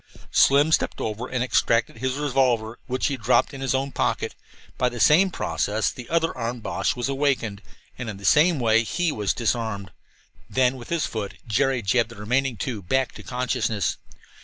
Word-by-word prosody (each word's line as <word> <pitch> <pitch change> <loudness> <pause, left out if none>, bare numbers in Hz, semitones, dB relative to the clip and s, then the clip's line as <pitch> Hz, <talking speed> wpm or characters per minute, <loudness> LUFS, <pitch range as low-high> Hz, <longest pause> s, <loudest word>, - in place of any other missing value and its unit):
Slim 145 +3 +5
stepped - - +1
over 110 +3 -3
and 125 -1 -1
extracted 115 -3 +1
his 130 +1 -1
revolver, 125 -6 0
which 130 0 -1
he 140 - 0
dropped 125 +5 +2
into 135 - -7
his 135 - +1
own 135 +1 -1
pocket. - - -1 0.4
By 125 - +1
the 120 -1 -7
same 175 - +5
process 110 - -1
the 120 -2 -10
other 165 0 +1
armed 120 -1 -4
Boche - - -1
was 120 0 -2
awakened, 135 -7 0 0.4
and 125 -3 -4
in 105 - -6
the 100 - -9
same 155 0 +5
way 115 -1 +3
he 175 +8 0
was 105 -6 -1
disarmed. 110 -5 -2 0.6
Then, 130 0 +2
with 120 -2 -10
his 170 -2 0
foot, 105 -3 -5
Jerry 130 +2 +1
jabbed 115 +3 +2
the 115 - -11
remaining 125 +4 -1
two 110 +1 -4
back 130 +8 0
to - - -11
consciousness. 125 -6 -1
125 Hz, 185 wpm, -24 LUFS, 110-135 Hz, 0.6 s, Slim